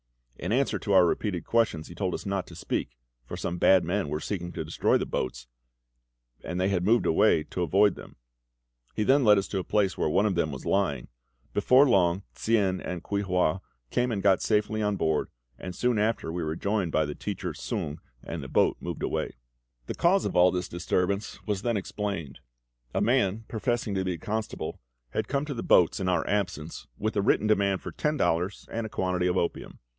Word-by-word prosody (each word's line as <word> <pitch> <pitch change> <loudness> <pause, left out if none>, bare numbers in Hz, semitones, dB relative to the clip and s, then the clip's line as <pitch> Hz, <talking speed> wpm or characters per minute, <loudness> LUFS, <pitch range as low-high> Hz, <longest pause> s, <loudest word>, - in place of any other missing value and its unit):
In - - -4
answer 135 +4 +1
to 100 - -1
our 95 -2 +7
repeated 90 0 -1
questions 110 -9 +1
he - - -10
told 90 0 -2
us - - -7
not 100 -1 -2
to - - -12
speak, - - -3 0.3
for - - -6
some 90 - -3
bad 95 0 +5
men 90 -2 -1
were 75 +1 -2
seeking 90 0 -4
to 80 - -4
destroy 80 - +2
the - - -2
boats, 65 -1 -3 1.0
and 90 - -4
they 95 +1 +2
had 90 -3 0
moved 115 +5 +3
away 80 0 +4
to 90 - -3
avoid 100 +4 +4
them. - - -12 0.8
He 110 - +1
then 135 +5 +4
led 105 -3 +6
us 100 - 0
to 100 - -2
the 95 - -1
place 100 -2 0
where - - +1
one 100 +7 +3
of 105 - +2
them 80 -3 0
was 65 - -7
lying. 85 -11 0 0.4
Before 125 +7 +5
long 95 -4 +3
Tsien 100 -5 +1
and 90 -2 -5
Kuei 100 0 -1
hua 90 -2 +1 0.3
came 125 0 +1
and 100 -4 -2
got 95 -2 +4
safely 105 0 +1
on 105 -1 +1
board, 80 -5 0 0.3
and 90 -1 -6
soon 125 +2 +1
after 105 -5 0
we 90 - -2
were 80 -1 -2
joined 100 -2 -1
by 80 - +2
the 75 - -4
teacher - - -4
Sung, 75 +2 -4 0.2
and 85 -2 -5
the 70 - -7
boat - - +2
moved - - -5
away. - - -2 0.5
The - - -4
cause 190 +3 +3
of - - -2
all 90 +1 +6
this 90 0 -2
disturbance 90 +3 -1
was 105 -3 -1
then 115 0 0
explained. 95 -8 -4 0.6
A - - +2
man 110 -3 +1
professing 115 -1 -1
to 95 -1 0
be 90 -1 -1
the - - -16
constable 110 0 -3 0.3
had 110 +6 -2
come 140 +1 -1
to 150 - -4
the 115 - -4
boats 90 +2 +4
in 95 -1 0
our 90 - +1
absence, 90 -6 -2
with 110 +1 -2
a 100 - +2
written 100 - +2
demand 100 -3 +2
for - - -5
ten 150 0 -1
dollars 90 -1 0
and 115 -1 -2
a - - -11
quantity 90 -2 0
of 90 +1 +1
opium. 85 - -2
95 Hz, 210 wpm, -27 LUFS, 85-105 Hz, 1.0 s, our